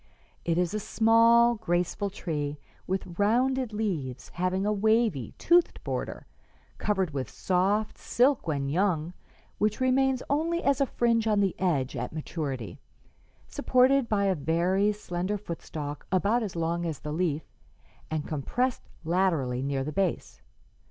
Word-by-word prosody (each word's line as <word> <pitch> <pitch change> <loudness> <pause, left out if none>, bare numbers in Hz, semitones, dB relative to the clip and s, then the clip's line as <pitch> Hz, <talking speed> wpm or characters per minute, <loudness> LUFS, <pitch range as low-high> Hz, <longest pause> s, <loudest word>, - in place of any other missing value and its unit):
It 170 -1 +1
is 180 0 +1
a 215 - -1
small, 230 +2 +5
graceful 200 -1 -1
tree 150 -6 -3 0.3
with 185 -1 -4
rounded 250 +4 +2
leaves 160 - -3
having 185 +2 -1
a 210 - +2
wavy, 215 - +1
toothed 345 +1 +3
border, - - -4 0.5
covered 195 -5 0
with 135 -2 -3
soft 195 +4 0
silk 260 -3 +2
when 140 -3 -1
young, 170 +1 0 0.5
which 210 0 +1
remains 260 0 +2
only 330 +4 0
as 280 0 +2
a 275 - +3
fringe 230 -2 +1
on 210 -2 +3
the 195 -3 +2
edge 145 -8 0
at 125 +2 -4
maturity, 145 - -5 0.7
supported 255 0 +3
by 205 -2 +2
a 195 - +3
very 175 +6 +1
slender 195 -1 -3
footstalk 155 -6 -6
about 200 +6 +2
as 205 -6 -4
long 170 +1 -1
as 160 -5 -4
the 150 - -4
leaf, 160 -2 0 0.7
and 155 -2 -3
compressed 245 - -2
laterally 165 -8 +1
from 135 - -2
near 135 -1 -1
the 150 - -4
base. 185 +2 -2
190 Hz, 145 wpm, -28 LUFS, 160-225 Hz, 0.7 s, small